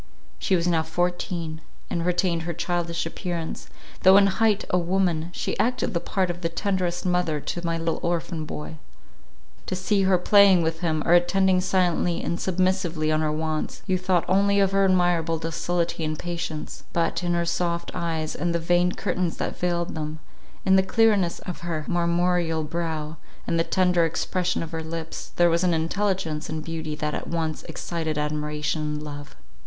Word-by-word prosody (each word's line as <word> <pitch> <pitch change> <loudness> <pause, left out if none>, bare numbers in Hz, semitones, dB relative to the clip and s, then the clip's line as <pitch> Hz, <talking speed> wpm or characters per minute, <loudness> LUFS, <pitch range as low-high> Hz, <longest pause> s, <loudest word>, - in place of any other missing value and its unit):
She 190 - +2
was 170 -1 +1
now 165 -2 +3
fourteen, 165 -1 -2 0.3
and 170 - -2
retained 180 -1 +1
her 170 +1 -3
childish 170 -1 -1
appearance, 165 -1 -4 0.3
though 190 +1 +8
in 200 - +7
height 210 +2 +2
a 180 - +3
woman; 175 -2 0
she - - -3
acted 250 -2 +1
the 170 - +1
part 185 0 0
of 175 0 -8
the 165 - 0
tenderest 180 0 -1
mother 180 -4 +1
to 175 +4 -4
my 165 -1 -1
little 165 0 -1
orphan 170 -1 -2
boy; 75 - -6 0.9
to 185 - -1
see 195 +2 +1
her 190 -1 +4
playing 195 -1 +6
with 160 0 -1
him, 160 -3 0
or 170 - +4
attending 185 +1 +4
silently 180 -2 +1
and 170 +1 -2
submissively 185 -4 +1
on 155 0 +2
our 155 -1 +1
wants, 155 0 -3
you 190 - +1
thought 180 -1 +1
only 200 +2 +3
of 195 -1 +3
her 195 0 +3
admirable 175 -3 +2
docility 165 +1 -2
and 155 0 -2
patience; 170 -3 -5
but, 170 +1 0
in 175 0 +1
her 170 0 +1
soft 170 0 -1
eyes, 165 -3 -2
and 175 -1 -1
the - - +1
veined 175 +2 +2
curtains 180 -2 -1
that - - -3
veiled 175 -1 -1
them, 155 0 -4 0.5
in 190 0 +5
the - - +6
clearness 200 -3 +2
of 180 - -6
her 165 -3 -3
marmoreal 170 -1 +1
brow, 160 -1 -3 0.3
and 165 - 0
the - - +4
tender 180 -1 +2
expression 175 +2 -1
of 165 - -7
her 165 -1 -3
lips, 160 0 -6
there 175 -1 +4
was 170 +2 +2
an 175 -2 +3
intelligence 165 -2 -1
and 155 -1 -4
beauty 160 -2 -4
that 150 0 -2
at - - -4
once 160 -2 -2
excited 160 -3 -3
admiration 150 +1 -1
and 150 0 -3
love. 145 -1 -8
170 Hz, 180 wpm, -25 LUFS, 160-180 Hz, 0.9 s, though